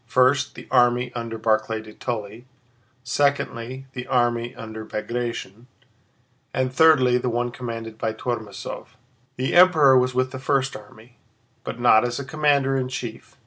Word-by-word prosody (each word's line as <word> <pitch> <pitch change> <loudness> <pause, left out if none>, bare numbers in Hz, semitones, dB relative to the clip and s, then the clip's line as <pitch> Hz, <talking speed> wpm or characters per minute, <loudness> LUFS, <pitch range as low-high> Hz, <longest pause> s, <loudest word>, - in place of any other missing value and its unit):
First, 130 +2 +2
the - - -11
army 125 0 +3
under 115 -1 -5
Barclay 110 0 0
de 110 -1 -12
Tolly, 115 +1 -5 0.6
secondly, 130 -1 -1
the 125 -1 -6
army 120 0 0
under 110 -2 -8
Bagratión, 115 0 -5 0.9
and 130 0 0
thirdly, 130 -5 +5
the 125 - -2
one 120 +1 -1
commanded 115 -2 -7
by 110 - -1
Tormásov. 110 -3 -5 0.5
The 130 +1 -2
Emperor 160 -7 +6
was 125 0 +2
with 130 0 +1
the 130 - -6
first 135 0 0
army, 115 +2 -14 0.4
but 115 - -6
not 120 -2 +5
as 120 +1 -2
commander 140 -1 +1
in 130 -1 -1
chief. 125 -2 -7
120 Hz, 145 wpm, -23 LUFS, 115-130 Hz, 0.9 s, Emperor